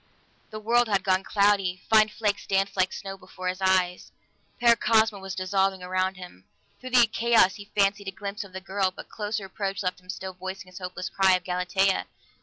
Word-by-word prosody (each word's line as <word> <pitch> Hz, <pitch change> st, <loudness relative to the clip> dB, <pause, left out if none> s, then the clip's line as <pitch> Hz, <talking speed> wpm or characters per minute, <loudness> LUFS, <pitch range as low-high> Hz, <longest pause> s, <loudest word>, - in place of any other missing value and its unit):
The 215 Hz, -, -7 dB
world 235 Hz, +2 st, +2 dB
had 200 Hz, -3 st, +1 dB
gone 190 Hz, 0 st, +2 dB
cloudy; 200 Hz, -3 st, +1 dB
fine 215 Hz, -1 st, +5 dB
flakes 210 Hz, -2 st, -2 dB
danced 195 Hz, 0 st, 0 dB
like 185 Hz, -1 st, +2 dB
snow 195 Hz, -1 st, -7 dB
before 185 Hz, 0 st, -6 dB
his 185 Hz, +1 st, -5 dB
eyes; 185 Hz, -1 st, +1 dB, 0.5 s
Paracosma 225 Hz, -3 st, +3 dB
was 190 Hz, 0 st, -6 dB
dissolving 190 Hz, 0 st, 0 dB
around 185 Hz, +1 st, -1 dB
him. 180 Hz, -, -12 dB, 0.3 s
Through 255 Hz, -, -8 dB
the 245 Hz, -2 st, +6 dB
chaos 225 Hz, -3 st, +3 dB
he 205 Hz, -, -10 dB
fancied 200 Hz, 0 st, +2 dB
a -, -, -2 dB
glimpse 200 Hz, +1 st, -6 dB
of 200 Hz, -, -14 dB
the 190 Hz, 0 st, -7 dB
girl, 190 Hz, 0 st, 0 dB
but 185 Hz, -, -12 dB
closer 210 Hz, -1 st, -4 dB
approach 195 Hz, +1 st, -4 dB
left 180 Hz, 0 st, -2 dB
him 180 Hz, -, -24 dB
still 190 Hz, 0 st, -5 dB
voicing 190 Hz, 0 st, -7 dB
his 185 Hz, -, -10 dB
hopeless 180 Hz, 0 st, -5 dB
cry 190 Hz, 0 st, +3 dB
of 180 Hz, -, -3 dB
"Galatea!" 180 Hz, +2 st, 0 dB
195 Hz, 195 wpm, -26 LUFS, 185-205 Hz, 0.5 s, the